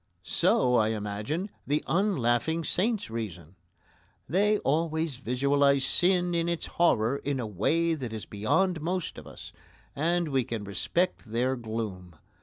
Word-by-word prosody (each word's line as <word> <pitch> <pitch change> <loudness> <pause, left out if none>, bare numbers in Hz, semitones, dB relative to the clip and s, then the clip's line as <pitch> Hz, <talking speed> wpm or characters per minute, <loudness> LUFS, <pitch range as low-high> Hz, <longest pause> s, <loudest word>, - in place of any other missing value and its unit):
So, 125 -1 +3
I 110 - +3
imagine, 110 - -3 0.2
the 150 +2 +1
unlaughing 160 - +1
saints 210 - 0
reason. 90 -8 -6 0.7
They 205 - +3
always 160 -2 0
visualise 140 +2 +2
sin 175 +2 +2
in 170 0 0
its 170 -1 -2
horror 135 -7 +2
in 140 -1 -2
a 120 - -2
way 160 - +1
that 130 -7 -4
is 110 -2 -6
beyond 160 - 0
most 180 +2 -3
of - - -13
us, - - -11 0.4
and 170 +3 +1
we 135 -2 +1
can 115 -3 -4
respect 100 - -1
their 120 +4 0
gloom. 110 -7 -5
140 Hz, 140 wpm, -28 LUFS, 110-170 Hz, 0.7 s, So